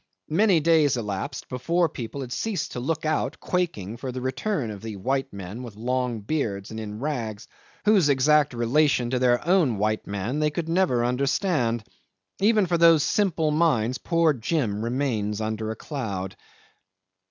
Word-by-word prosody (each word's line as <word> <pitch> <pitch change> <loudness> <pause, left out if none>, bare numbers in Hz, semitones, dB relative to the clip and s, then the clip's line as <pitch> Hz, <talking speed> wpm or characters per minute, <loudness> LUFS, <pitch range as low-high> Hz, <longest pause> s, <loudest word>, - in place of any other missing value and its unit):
Many 190 +1 +4
days 155 -4 +3
elapsed 115 +5 -4
before 165 +8 +1
the - - -3
people 125 +3 -5
had 125 -2 -5
ceased 220 -4 -2
to - - -4
look 155 +5 -2
out, 155 - -1
quaking, 120 - -2
for 130 +1 -5
the 130 - -5
return 130 - -2
of 100 -2 -8
the 110 -2 -6
white 135 +8 -1
men 100 +4 -7
with 120 -5 -9
long 125 0 -1
beards 105 -6 -2
and 110 - -5
in 105 -1 -6
rags, 115 -7 -4 0.4
whose 200 -8 +5
exact 140 0 +3
relation 120 +1 +2
to 130 - +1
their 120 0 +2
own 170 - +3
white 110 +1 -1
man 100 +8 -2
they 150 0 +2
could 160 +2 -4
never 165 -9 +2
understand. 125 - 0 0.6
Even 210 0 +4
for 170 -1 0
those 165 -3 +6
simple 165 -4 +1
minds 135 -7 +2
poor 165 -2 +2
Jim 115 -5 -1
remains 115 -4 -1
under 110 0 -3
a 110 - -3
cloud. 100 - -5
130 Hz, 165 wpm, -25 LUFS, 110-155 Hz, 0.6 s, those